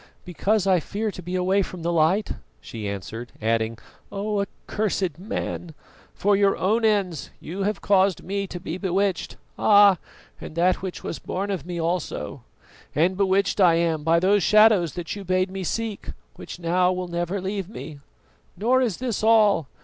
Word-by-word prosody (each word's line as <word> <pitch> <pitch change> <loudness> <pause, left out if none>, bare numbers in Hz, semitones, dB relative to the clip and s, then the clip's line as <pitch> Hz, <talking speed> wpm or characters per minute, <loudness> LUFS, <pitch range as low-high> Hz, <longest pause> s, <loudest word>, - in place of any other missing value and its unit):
"Because 195 +3 0
I 190 -2 +4
fear 210 +6 -3
to 180 - -9
be 180 +1 -5
away 185 +2 +2
from 180 -3 -6
the 170 - 0
light," 170 +6 +2 0.3
she 100 - -6
answered; 110 +5 -6
adding, 115 0 0 0.3
"Oh, 205 +1 -1
accursed 195 -4 -3
man! 180 -5 -5 0.4
for 205 +1 +2
your 195 0 +3
own 215 +7 +1
ends 200 -7 +1
you 180 +5 -6
have 210 - -5
caused 195 -2 +2
me 200 +1 -3
to 175 - -7
be 175 +1 -5
bewitched, 190 -1 -1 0.2
ah! 205 -4 +6 0.4
and - - -8
that 180 +2 +3
which 185 -2 -6
was - - -5
born 200 +2 -3
of 175 -5 -4
me 175 -1 -4
also, 170 +1 -3 0.5
and 170 +6 +2
bewitched 195 +1 +1
I 175 -3 +6
am 165 -2 +1
by 165 +2 +3
those 195 +3 +3
shadows 210 -3 +5
that 175 +1 -4
you 200 - -7
bade 185 0 0
me 190 0 -4
seek, 220 +3 -3 0.3
which - - -9
now 180 +1 +2
will 180 0 -3
never 175 +3 -2
leave 190 0 -4
me. 155 -9 -9 0.6
Nor, 250 +5 +3
is 230 -8 0
this 245 -5 -2
all. 210 -8 +4
185 Hz, 170 wpm, -24 LUFS, 170-200 Hz, 0.6 s, ah